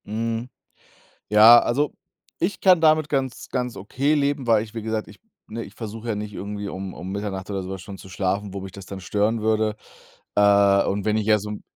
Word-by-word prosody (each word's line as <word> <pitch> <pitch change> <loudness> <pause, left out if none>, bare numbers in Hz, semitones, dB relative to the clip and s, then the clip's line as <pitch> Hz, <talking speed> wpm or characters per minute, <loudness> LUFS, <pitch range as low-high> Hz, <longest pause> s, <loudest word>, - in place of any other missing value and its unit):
Mhm. 115 +3 -3 0.8
Ja, 110 +3 +9
also, 145 +6 0 0.5
ich 175 +1 -1
kann 185 -3 +5
damit 155 -1 +4
ganz 135 -3 -2
ganz 125 -2 -2
okay 135 +9 0
leben, 140 -2 0
weil 110 -2 +4
ich, 110 -1 -12
wie 115 - -5
gesagt, 110 0 -3
ich - - -15 0.3
ne, 115 +2 -5
ich - - -13
versuch 110 0 -7
ja 115 -3 -1
nicht 105 0 -5
irgendwie 100 +1 -5
um 95 -1 -6
um 95 +2 -7
Mitternacht 100 -2 -4
oder 100 -1 -2
so 95 - -7
was 95 -1 -6
schon 95 +1 -9
zu 95 - -13
schlafen, 95 +1 -2
wo 100 - -4
mich 95 0 -8
das 100 0 -11
dann 100 - -7
stören 105 +4 0
würde. 110 0 +1 0.6
Äh, 100 -1 +5
und 100 0 -2
wenn 110 0 +2
ich 110 - -1
jetzt 105 -1 +3
um 105 0 -6
105 Hz, 215 wpm, -23 LUFS, 100-115 Hz, 0.8 s, Ja